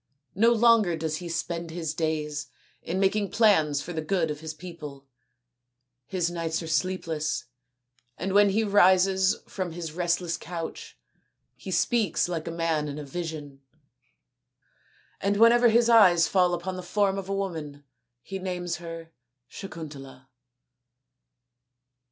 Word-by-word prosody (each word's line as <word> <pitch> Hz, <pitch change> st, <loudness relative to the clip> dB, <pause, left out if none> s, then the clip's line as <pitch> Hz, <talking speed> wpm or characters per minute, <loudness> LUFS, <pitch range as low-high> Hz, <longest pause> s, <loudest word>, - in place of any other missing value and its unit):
No 230 Hz, +5 st, +4 dB
longer 225 Hz, -7 st, +4 dB
does 160 Hz, -1 st, -2 dB
he 175 Hz, 0 st, -7 dB
spend 170 Hz, 0 st, -3 dB
his 160 Hz, -2 st, -4 dB
days 150 Hz, -2 st, -2 dB, 0.3 s
in 180 Hz, +3 st, -3 dB
making 200 Hz, +1 st, +1 dB
plans 160 Hz, -10 st, +3 dB
for 175 Hz, -, -7 dB
the 160 Hz, -, -2 dB
good 160 Hz, -1 st, 0 dB
of 150 Hz, -, -6 dB
his 160 Hz, 0 st, -6 dB
people. 155 Hz, -4 st, -10 dB, 1.0 s
His 175 Hz, -1 st, -1 dB
nights 165 Hz, -1 st, -2 dB
are -, -, -7 dB
sleepless, 160 Hz, -3 st, -1 dB, 0.7 s
and 190 Hz, -, -3 dB
when 205 Hz, 0 st, +6 dB
he 215 Hz, +3 st, +1 dB
rises 190 Hz, 0 st, +4 dB
from 185 Hz, -4 st, -4 dB
his 165 Hz, -2 st, -5 dB
restless 175 Hz, 0 st, -1 dB
couch 165 Hz, -1 st, -7 dB, 0.6 s
he -, -, -10 dB
speaks 235 Hz, -8 st, +1 dB
like 165 Hz, -3 st, -4 dB
a -, -, -3 dB
man 165 Hz, -2 st, -1 dB
in 145 Hz, 0 st, -5 dB
a 150 Hz, -, -6 dB
vision; 150 Hz, -3 st, -6 dB, 1.6 s
and 200 Hz, +1 st, 0 dB
whenever 235 Hz, +2 st, +6 dB
his 235 Hz, +1 st, +4 dB
eyes 185 Hz, -8 st, +6 dB
fall 180 Hz, -2 st, +3 dB
upon 185 Hz, +2 st, -5 dB
the -, -, -5 dB
form 195 Hz, +1 st, 0 dB
of 195 Hz, 0 st, -8 dB
a 195 Hz, -, -1 dB
woman 160 Hz, -7 st, -5 dB, 0.4 s
he 195 Hz, 0 st, -6 dB
names 180 Hz, -2 st, -3 dB
her 165 Hz, -1 st, -9 dB, 0.4 s
Sakuntala." 140 Hz, -8 st, -9 dB
175 Hz, 140 wpm, -26 LUFS, 160-195 Hz, 1.6 s, when